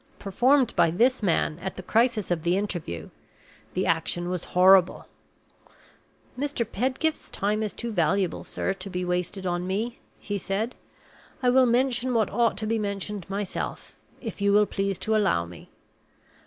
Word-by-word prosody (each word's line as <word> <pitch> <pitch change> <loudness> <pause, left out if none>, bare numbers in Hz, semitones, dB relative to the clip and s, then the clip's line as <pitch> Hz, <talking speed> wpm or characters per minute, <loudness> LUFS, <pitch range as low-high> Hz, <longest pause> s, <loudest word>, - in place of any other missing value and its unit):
Performed 250 +6 +2
by - - +4
this 240 +10 +2
man, 170 -4 +1
at 190 +2 -5
the 185 - -8
crisis 225 -1 +1
of 170 -2 0
the 175 +3 +1
interview, 170 - -4 0.6
the 185 - 0
action 175 +2 0
was 180 -2 -3
horrible. 185 0 +5 1.3
"Mr. 280 -3 -1
Pedgift's 260 +8 -1
time 210 +2 -1
is 215 -2 -1
too 235 -1 -5
valuable, 185 0 0
sir, 195 - -2
to 195 0 -8
be 180 -1 -3
wasted 180 +2 -2
on 175 0 -1
me," 220 +5 -2 0.2
he 205 -1 -4
said. 205 +6 -2 0.7
"I 250 - +4
will 260 0 +5
mention 250 0 +1
what 220 -2 +2
ought 235 -1 +2
to 215 - -3
be 225 +1 0
mentioned 200 -2 -4
myself 200 -1 -4 0.3
if 225 -5 -7
you 200 0 +3
will 210 +1 +5
please 195 -2 -2
to 220 0 0
allow 190 - +2
me. 85 0 -13
200 Hz, 160 wpm, -26 LUFS, 180-230 Hz, 1.3 s, horrible